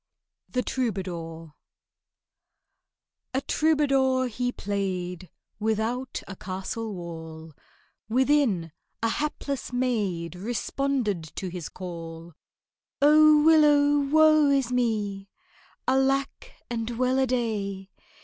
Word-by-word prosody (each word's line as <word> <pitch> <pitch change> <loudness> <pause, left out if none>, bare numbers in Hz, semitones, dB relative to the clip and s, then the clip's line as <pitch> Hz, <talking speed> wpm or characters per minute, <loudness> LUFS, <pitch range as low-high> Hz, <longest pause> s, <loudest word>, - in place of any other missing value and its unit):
THE 250 -1 -1
TROUBADOUR 170 - -4 1.8
A 265 - +1
TROUBADOUR 270 -5 +2
he 245 +2 -2
played 185 -4 -3 0.3
Without 220 +4 -1
a 190 - -7
castle 195 +4 -5
wall, 160 -2 -8 0.6
Within, 250 - +2 0.3
a 230 - +3
hapless 280 -1 -3
maid 205 -10 -1
Responded 235 -1 -1
to 190 - -4
his 175 -3 -6
call. 165 -2 -8 0.7
"Oh, 300 +1 +6
willow, 295 -2 +5
woe 310 +1 +5
is 270 -3 +2
me! 210 -5 -1 0.6
Alack 270 +1 +1 0.2
and 230 -1 -3
well 255 +1 +2
a 265 - +2
day! 205 -6 -2
230 Hz, 90 wpm, -26 LUFS, 185-270 Hz, 1.8 s, Oh